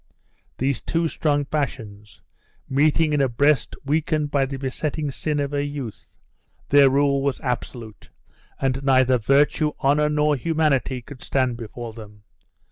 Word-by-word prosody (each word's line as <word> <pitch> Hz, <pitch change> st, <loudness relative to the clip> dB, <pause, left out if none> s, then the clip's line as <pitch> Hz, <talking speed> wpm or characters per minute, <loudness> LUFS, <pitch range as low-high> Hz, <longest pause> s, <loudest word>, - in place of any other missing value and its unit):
These 135 Hz, -1 st, -1 dB
two 165 Hz, 0 st, 0 dB
strong 145 Hz, -2 st, 0 dB
passions, 110 Hz, -8 st, -5 dB, 0.4 s
meeting 150 Hz, +3 st, +2 dB
in 145 Hz, -, +2 dB
a 135 Hz, -, +2 dB
breast 140 Hz, +3 st, +2 dB
weakened 150 Hz, 0 st, 0 dB
by 140 Hz, -2 st, +2 dB
the 135 Hz, 0 st, -5 dB
besetting 145 Hz, +2 st, -3 dB
sin 150 Hz, +2 st, -2 dB
of 140 Hz, 0 st, -2 dB
her 145 Hz, -1 st, 0 dB
youth, 145 Hz, -6 st, -6 dB, 0.6 s
their 140 Hz, -1 st, +6 dB
rule 140 Hz, 0 st, +2 dB
was 140 Hz, -1 st, -1 dB
absolute, 120 Hz, -4 st, -5 dB, 0.5 s
and 135 Hz, 0 st, 0 dB
neither 130 Hz, -2 st, +3 dB
virtue, 145 Hz, +5 st, +2 dB
honor, 150 Hz, +2 st, +2 dB
nor 150 Hz, 0 st, +2 dB
humanity 140 Hz, -4 st, 0 dB
could 135 Hz, 0 st, -12 dB
stand 130 Hz, -3 st, 0 dB
before 115 Hz, 0 st, -8 dB
them. 105 Hz, -2 st, -13 dB
140 Hz, 140 wpm, -23 LUFS, 130-150 Hz, 0.6 s, their